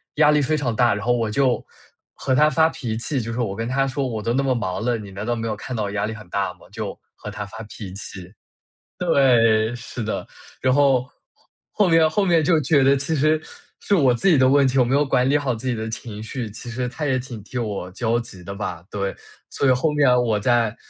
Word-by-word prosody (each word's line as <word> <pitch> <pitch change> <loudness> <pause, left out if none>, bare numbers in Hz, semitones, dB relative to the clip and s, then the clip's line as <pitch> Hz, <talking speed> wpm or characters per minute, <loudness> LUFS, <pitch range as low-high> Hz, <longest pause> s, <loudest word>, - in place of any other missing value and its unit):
压 150 -1 +5
力 150 0 +3
非 155 +3 +1
常 125 -6 -1
大， 120 -2 +3
然 105 +1 -5
后 120 - +3
我 115 -2 0
就 125 +3 +1 0.5
和 130 - -1
她 150 +3 +5
发 160 +2 +4
脾 120 -8 -4
气， 130 +3 -2
就 115 0 -5
是 115 - -4
我 105 -5 -1
跟 115 +2 -3
她 135 +1 +1
说 135 0 -2
我 110 -3 -4
都 115 - 0
那 135 - +2
么 135 -2 +1
忙 95 -3 -3
了， 120 0 +1
你 105 -3 -9
难 100 +2 -6
道 120 +2 -1
没 115 0 -3
有 110 - -2
看 125 +4 -6
到 110 - -1
我 100 - -3
压 105 0 -1
力 110 - -5
很 105 -4 -12
大 100 -2 -1
吗？ - - -28
就 - - -6 0.2
和 - - -8
她 105 - -5
发 110 +2 -9
脾 105 -3 -9
气。 95 -1 -9 0.7
对， 115 -4 +4
是 120 0 -7
的， 110 - -3 0.3
然 130 0 +2
后， 135 -3 +3 0.6
后 205 -3 +2
面 165 -1 +5
后 200 +4 +1
面 170 -3 +4
就 160 0 +3
觉 140 +1 +3
得 135 +1 +5
其 140 +4 -1
实 155 +1 +2 0.4
是 205 - 0
我 140 -9 +4
自 120 - -1
己 170 - +6
的 130 -1 +4
问 140 0 +5
题， 130 - 0
我 130 - +5
没 120 - -2
有 145 +2 +4
管 130 -2 +2
理 145 - +4
好 135 -4 -1
自 115 +3 -5
己 125 - +1
的 110 0 -4
情 110 -1 -7
绪， 110 +1 -5
其 115 +3 -9
实 125 +1 -3
她 150 +4 -4
也 130 -2 +1
挺 125 -3 -6
替 125 - -6
我 105 -6 -3
焦 115 +4 0
急 115 -6 -8
的 100 +2 -7
吧， 85 -5 -5
对。 100 -1 -3 0.4
所 140 - 0
以 - - +6
后 130 +5 +2
面 145 -3 +4
我 110 -4 0
再 115 0 +2
120 Hz, 275 characters per minute, -22 LUFS, 110-140 Hz, 0.7 s, 己